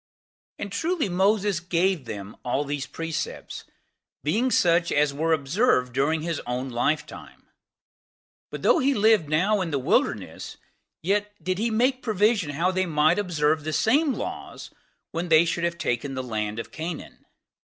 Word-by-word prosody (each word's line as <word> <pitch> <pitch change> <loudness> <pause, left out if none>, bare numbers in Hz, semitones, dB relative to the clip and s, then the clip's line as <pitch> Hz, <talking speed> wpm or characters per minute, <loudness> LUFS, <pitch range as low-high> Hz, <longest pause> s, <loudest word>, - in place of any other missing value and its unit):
3. - - -5
And 200 - -6
truly 325 - -1
Moses 195 +1 +2
gave 175 -2 0
them 105 -2 -7
all 135 +4 -1
these 145 0 -3
precepts, 165 -1 -5 0.6
being 220 - +1
such 170 -6 +3
as 145 -1 +2
were 160 +3 0
observed 145 - +2
during 155 +4 +1
his 165 -2 -2
own 125 +2 -2
lifetime; 130 +6 -3 1.0
but - - -7
though - - +5
he 275 +1 +2
lived 210 -7 +3
now 190 +7 +2
in 175 - -2
the 145 - 0
wilderness, 130 - -1 0.5
yet 205 +3 0
did 185 +2 -1
he 230 +2 +1
make 255 +4 +1
provision 210 -5 +1
how 165 +6 0
they 185 0 0
might 155 +3 +3
observe 155 -5 +1
the 155 - -3
same 280 - +2
laws - - -6 0.4
when 170 +1 -3
they 160 +1 +6
should 170 0 -2
have 170 0 -1
taken 135 -1 -2
the 130 - -3
land 110 -3 -3
of 115 - -6
Canaan. 160 0 -7
165 Hz, 160 wpm, -25 LUFS, 145-205 Hz, 1.0 s, they